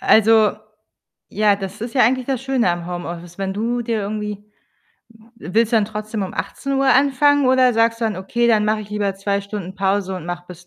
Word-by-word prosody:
Also 220 -1 +5 0.8
ja, 210 -1 +2
das 195 +1 -7
ist 230 +1 -6
ja 255 - +4
eigentlich 255 +2 +2
das 265 -2 -2
Schöne 260 -8 +1
am 175 0 -4
Homeoffice, 175 0 -7
wenn 190 -1 -2
du 235 +4 -1
dir 230 -2 -2
irgendwie 210 0 -4 0.9
w 175 - -9
willst 230 +1 +2
du - - +5
dann 215 - +3
trotzdem 215 0 -5
um 190 - -5
18:00 275 0 -2
anfangen 285 +1 +3
oder 255 -1 +4
sagst 230 +1 +2
du - - 0
dann: 215 -4 -1
„Okay, 235 +6 -1
dann 215 -2 +3
mache 215 0 +1
ich 205 - -14
lieber 205 -2 -1
2 200 +1 -1
Stunden 200 -2 -7
Pause 195 0 -1
und 175 -2 -8
mache 175 0 -5
bis 180 0 -12
210 Hz, 210 wpm, -20 LUFS, 195-235 Hz, 0.9 s, Also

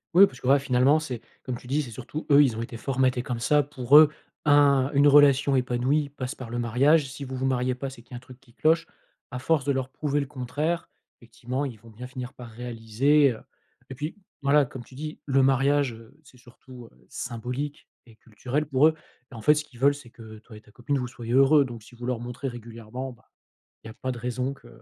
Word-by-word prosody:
Oui, 195 +3 +9
parce 130 -9 -10
que, 125 - -4
voilà 140 +1 +5
finalement, 135 +3 +3
c'est, 125 -7 -6 0.2
comme 130 - -4
tu 125 - -14
dis, 140 +4 0
c'est 120 - -9
surtout 130 +7 -7
eux, 140 +1 +8
ils 120 -5 0
ont - - -3
été 115 0 -8
formatés 130 0 0
comme 120 -1 -4
ça. 145 +5 +3
Pour 140 0 +4
eux, 155 -1 +8 0.4
un 140 -2 +4
une 145 +1 +5
relation 140 -1 +5
épanouie 130 +4 0
passe 130 -2 -5
par 125 -3 -9
le 120 - -4
mariage. 135 +6 +3
Si 140 - -8
vous 130 0 -6
vous 130 +1 -2
mariez 125 -1 0
pas, 135 +2 -5
c'est 130 - -13
qu'il 120 - -17
y - - -5
a - - -5
un - - -8
truc 130 0 -15
qui 125 -3 -24
cloche. 165 +4 +2 0.4
À 125 - -5
force 145 +2 +1
de 140 - +1
leur 130 -1 -2
prouver 145 +2 -2
le 140 - -1
contraire, 145 +5 -3 0.3
effectivement, 120 +3 -5
ils 125 -6 -5
vont 115 +1 -16
bien 125 +4 -9
finir 130 0 -7
par 120 -3 -11
réaliser, 120 +4 +1
heu - - -12 0.5
et 130 - -6
puis 150 +4 -5 0.3
voilà, 140 +1 +4
comme 125 -1 -9
tu 130 - -17
dis, 155 +2 -7
le 135 -1 +3
mariage, 135 0 +2
heu, 115 +4 -15
c'est 130 - -19
surtout, 125 0 -14
heu, - - -26
symbolique 125 +4 -5 0.2
et 115 - -17
culturel 125 +7 -4
pour 145 +1 +4
eux. 160 - +2 0.4
Et 125 - -11
en 110 - -8
fait, 150 - +5
ce 150 0 -2
qu'ils 125 -5 -18
veulent, 140 +2 +4
c'est 135 -5 -13
que 110 -2 -12
toi 110 0 -15
et - - -14
ta 105 - -22
copine 130 +5 -2
vous 125 -1 -3
soyez 120 -1 -6
heureux. 135 +2 +5
Donc, 120 -4 -9
si 120 - -17
vous 120 - -8
leur 125 -2 -2
montrez 125 +3 -6
régulièrement, 120 +2 -7
bah, 120 - -19 0.6
il 110 - -10
y - - -8
a - - -12
pas 130 0 -4
de 120 - -7
raison 125 +2 -2
que - - -18
130 Hz, 245 wpm, -26 LUFS, 120-140 Hz, 0.6 s, Oui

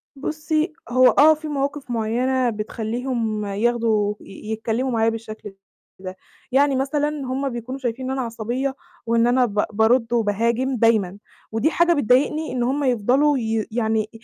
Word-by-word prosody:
بُصّي، 310 +3 -2 0.2
هو 255 +1 +5
آه، 310 +2 +6
في 310 0 -7
مواقف 280 -2 -3
معيّنة 245 +3 0
بتخلّيهم 220 0 -3
ياخدوا 215 0 +1
ي 215 +3 -9
يتكلّموا 225 +4 -1
معايا 225 -1 +2
بالشكل 215 -2 -7 0.5
ده. 185 0 -7 0.4
يعني 275 +1 +3
مثلًا 290 +3 0
هم 275 -2 -3
بيكونوا 245 +3 -6
شايفين 250 0 -3
إن 260 - -2
أنا - - 0
عصبية، 240 +4 -3 0.3
وإن 230 0 +2
أنا 250 +1 +3
ب 210 -2 0
بارُدّ 230 +2 +2
وباهاجم 235 +4 +1
دايمًا. 210 -4 +2 0.3
ودي 225 +8 +1
حاجة 345 0 +3
بتضايقني 290 +3 +1
إن 250 -1 -1
هم 270 +4 0
يفضلوا 260 +4 +2
ي 225 -2 -1
يعني 220 -2 0
240 Hz, 150 wpm, -22 LUFS, 220-270 Hz, 0.5 s, آه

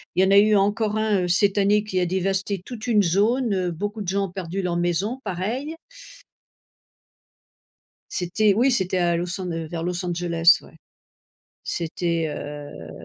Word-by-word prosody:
Il 185 - +4
y - - +3
en - - +2
a 200 - +6
eu 215 0 +4
encore 210 +2 +1
1, 215 -3 +1
heu, - - -1
cette 200 +3 +3
année 205 +1 +3
qui 185 -3 -1
a 180 - +1
dévasté 190 +1 -1
toute 240 -1 -7
une 210 -4 +4
zone, 210 +6 +2
heu, 180 -2 -1
beaucoup 205 +5 -4
de - - -10
gens 195 +1 0
ont - - -13
perdu 190 0 -4
leur 175 -1 -1
maison, 180 +9 -1
pareil. 240 - -3 2.4
C'était 200 +4 +1
oui, 250 +6 +3
c'était 190 -4 0
à 175 -1 +2
Los 175 +2 -3
An 180 - -4
heu, 165 -1 -4
vers 165 0 -5
Los 180 +1 -2
Angeles, 170 -1 +4
ouais. - - -17 0.9
C'était, 170 -1 -2
heu 145 - -7
190 Hz, 175 wpm, -23 LUFS, 175-210 Hz, 2.4 s, a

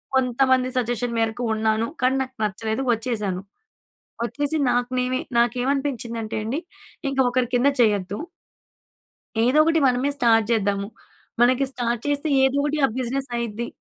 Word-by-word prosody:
కొంతమంది 260 0 +2
సజెషన్ 245 0 -1
మేరకు 225 +2 -1
ఉన్నాను. 220 +1 +1 0.2
కానీ 255 +1 +3
నాకు 260 0 -11
నచ్చలేదు 220 +4 -2
వచ్చేసాను. 210 -5 -2 0.8
వచ్చేసి 290 +6 -2
నాకు 245 0 +1
నేనే 255 +1 0 0.2
నాకేమనిపించిందంటే 240 -2 -1
అండి, 245 +8 -2 0.5
ఇంక 275 0 -3
ఒకరి 245 -1 +1
కింద 245 +3 +3
చేయొద్దు. 205 -2 +1 1.3
ఏదో 255 +5 +3
ఒకటి 325 0 +3
మనమే 255 +3 +1
స్టార్ట్ 225 -3 +3
జేద్దాము. 200 -2 0 0.5
మనకి 255 +3 +4
స్టార్ట్ 240 -3 -2
చేస్తే 290 +2 0 0.2
ఏదోకటి 285 +3 +1
ఆ - - +1
బిజినెస్ 260 +1 -3
అయిద్ది. 235 0 -3
245 Hz, 125 wpm, -23 LUFS, 225-265 Hz, 1.3 s, మనకి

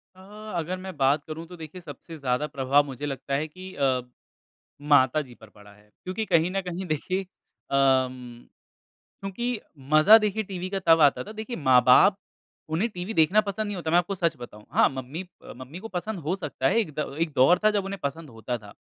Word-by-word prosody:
अ, - - -19 0.4
अगर 175 +3 -3
मैं 185 -2 -8
बात 140 +2 +2
करूँ 160 +1 -6
तो 180 - -11
देखिए 165 +3 -9
सबसे 160 +1 -10
ज़्यादा 135 +1 -1
प्रभाव 140 +1 +2
मुझे 140 +1 -6
लगता 140 0 -5
है 150 +3 -1
कि 185 +4 -11
अ, 130 -2 +1 0.8
माताजी 145 -2 +2
पर 110 - -16
पड़ा 105 0 -17
है। 105 +1 -22 0.2
क्योंकि 185 +4 -3
कहीं 165 -1 +2
न 195 +1 -1
कहीं 180 +2 -4
देखिए 185 +5 -2
अ, 185 -6 -13
उम, 130 -3 0 0.8
क्योंकि 235 +5 -3 0.3
मज़ा 180 +9 +8
देखिए 215 0 -1
टीवी 185 -2 -6
का 195 0 -2
तब 165 -1 +6
आता 145 -2 +4
था, 215 - -10
देखिए 220 +2 -6
माँ-बाप 130 +7 +5 0.6
उन्हें 210 +9 +1
टीवी 180 +2 -6
देखना 185 +4 +4
पसंद 215 +1 -3
नहीं 205 - -4
होता। 165 -3 -3
मैं 170 - +5
आपको 180 +3 0
सच 170 -2 0
बताऊँ। 105 -3 -11
हाँ, - - +4
मम्मी 135 +5 -6 0.2
अ, - - -10
मम्मी 130 +7 -9
को 225 - -8
पसंद 215 +2 -4
हो 180 - +1
सकता 145 -7 -2
है 225 - +2
एक 205 -9 -1
द 140 - -3
एक 165 -2 0
दौर 170 +8 +5
था 215 - +5
जब 195 - -1
उन्हें 195 -1 -5
पसंद 145 +2 -4
होता 120 +1 -5
था। 105 -2 -14
160 Hz, 205 wpm, -26 LUFS, 135-190 Hz, 0.8 s, मज़ा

